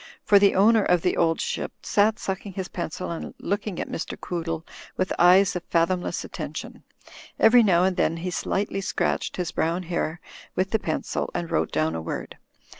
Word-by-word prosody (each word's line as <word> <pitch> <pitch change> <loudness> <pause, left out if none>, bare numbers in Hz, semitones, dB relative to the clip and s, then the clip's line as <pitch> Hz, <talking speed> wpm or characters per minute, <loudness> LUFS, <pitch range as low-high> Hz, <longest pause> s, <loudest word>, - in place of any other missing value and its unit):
For 205 - +6
the 200 0 +4
owner 220 +3 +5
of 180 -3 +2
"The 180 - +2
Old 165 -1 +2
Ship" - - -2
sat 215 +1 +2
sucking 195 0 -4
his 190 0 -5
pencil 175 0 -4
and 170 - -6
looking 200 -2 -3
at - - -3
Mr. - - -5
Quoo 175 -2 -4
dle 165 0 -4 0.3
with 185 - 0
eyes 185 +2 +6
of 180 - -3
fathomless 175 +2 0
attention. - - -7 0.6
Every 235 +2 +7
now 180 -5 +4
and 190 0 +2
then 165 -1 +1
he 180 +2 -4
slightly 195 +3 -1
scratched 195 - -1
his 180 -2 -2
brown 170 +3 -1
hair 170 -1 -2 0.4
with 190 +1 0
the 220 - +2
pencil, 160 -5 -2
and 170 -1 -3
wrote 80 0 0
down 80 +1 0
a 80 - -3
word. 80 - -6
180 Hz, 190 wpm, -25 LUFS, 165-195 Hz, 0.6 s, Every